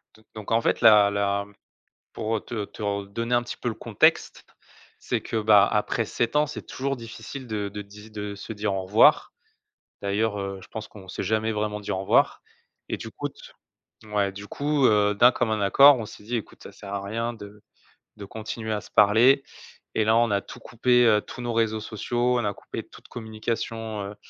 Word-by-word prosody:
D 110 - -20
donc, 110 -2 -8
en 115 +1 +3
fait, - - 0
la 105 -2 +7
la, 100 0 0 0.7
pour, 110 0 -2
heu, - - -3
te 110 -3 -5
te 100 - -11
re 100 -1 -2
donner 115 +4 -2
un 120 - +3
petit 120 - -7
peu - - -3
le 115 - -3
contexte, - - +1 0.5
c'est - - -2
que, - - -5
bah, 105 -2 +6
après 105 +2 0
7 115 +3 -2
ans, 150 0 +4
c'est 150 - -8
toujours 135 +1 -3
difficile 125 +3 -9
de 105 -3 -3
de 105 +1 -7
di 105 +2 -14
de 105 -1 -5
se 100 +2 -8
dire 105 -1 -2
au 95 - -2
revoir, 100 +4 +4 0.7
d'ailleurs, 105 +1 -1
heu, 100 0 -4
je 95 - -14
pense 110 -1 -7
qu'on 95 -3 -14
s'est - - -4
jamais 110 +1 0
vraiment 105 -1 -2
dit 100 - -5
au 95 - -1
revoir 95 - +2 0.5
et - - -1
du - - -8
coup - - -4
t - - -18 0.7
ouais 105 -2 0
du 100 +1 -10
coup, 145 +1 0
heu, 105 -1 +3
d'un 120 +4 +6
commun 110 -3 -1
accord, 140 +8 +7
on 110 - -4
s'est 105 - -12
dit: 120 +4 -3
«Écoute, 110 - -9
ça - - -10
sert 100 0 -9
à 100 - -2
rien 115 +4 -3
de 105 -2 -12 0.6
de 100 - -8
continuer 110 +2 -6
à 105 - -2
se - - -15
parler». 115 +7 +5 0.5
Et 110 - +2
là, 110 +1 +4
on 120 0 +3
a 100 0 +1
tout - - -12
coupé, 125 +1 +2
heu, 105 -2 +4
tous 125 - -10
nos 120 -1 -3
réseaux 110 -1 +1
sociaux, 120 +4 -1
on 120 - -2
a 100 - -1
coupé - - -7
toute - - -17
communication, 110 -1 -4
heu, - - -12
110 Hz, 215 wpm, -25 LUFS, 100-115 Hz, 0.7 s, la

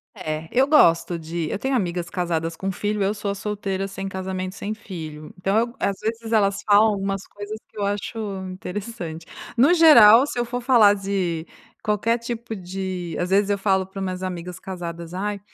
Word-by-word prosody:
É, 160 -3 -4
eu 260 +3 +3
gosto 170 - +4
de 165 0 -4
eu 205 - -2
tenho 265 +3 0
amigas 175 -6 -1
casadas 170 -3 -2
com 190 +3 -3
filho, 205 +1 -1
eu 200 +2 +1
sou 205 -1 -4
a - - -4
solteira 195 -1 -3
sem 195 0 -6
casamento, 190 0 -4
sem 205 +2 -4
filho, 160 -8 -8
então 195 +2 0
eu 235 +2 -2
às 195 -1 -1
vezes 225 +1 -4
elas 200 -3 +2
falam 210 +1 +6
algumas 195 -1 -3
coisas 205 +1 -7
que - - -21
eu 205 - -1
acho 205 +3 -3 0.3
interessante, 185 -3 -6 0.3
no 255 +7 +5
geral 265 -8 +8
se 265 - -4
eu - - +2
for 245 +1 -4
falar 235 -5 +6
de 190 -5 -2 0.4
qualquer 215 +3 +1
tipo 235 -1 -5
de 185 -2 -5
às 180 - -1
vezes 200 +1 +3
eu 200 - +1
falo 195 -1 +1
para 190 +1 -9
as - - -2
minhas 185 0 -4
amigas 180 -1 -5
casadas: 170 -3 -7
"Ai, 205 +2 -2
195 Hz, 195 wpm, -23 LUFS, 180-215 Hz, 0.4 s, geral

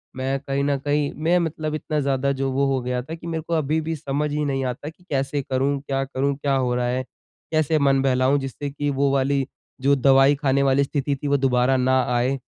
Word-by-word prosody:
मैं 135 +1 -1
कहीं 140 0 -2
न 140 0 +1
कहीं 145 +1 0
मैं 170 +2 +3
मतलब 155 -2 -2
इतना 155 0 -2
ज़्यादा 140 -1 0
जो 135 -1 0
वो 140 +2 +1
हो 130 - 0
गया 125 0 -2
था 160 +5 -7
कि 165 0 -10
मेरे 165 -1 -2
को 170 - -2
अभी 155 0 +1
भी 160 +1 -3
समझ 145 +1 -2
ही 150 0 -1
नहीं 135 -1 -1
आता 130 +4 -4
कि 160 +3 -18
कैसे 140 0 -1
करूँ, 135 +2 0
क्या 135 -1 -2
करूँ, 140 +1 -1
क्या 140 0 0
हो 125 -2 0
रहा 125 0 0
है, 125 +1 -1 0.5
कैसे 155 0 +2
मन 135 -1 +3
बहलाऊँ, 130 +1 +2
जिससे 135 +1 -5
कि 145 +1 -3
वो 140 0 +1
वाली 135 0 +1 0.4
जो 140 +1 +4
दवाई 135 +1 +5
खाने 140 -1 +1
वाली 135 0 +3
स्थिति 140 0 -1
थी, 140 +2 -5
वो 140 0 +3
दोबारा 130 -1 +2
ना 130 +1 +3
आए। 125 +3 +1
140 Hz, 230 wpm, -23 LUFS, 135-145 Hz, 0.5 s, दवाई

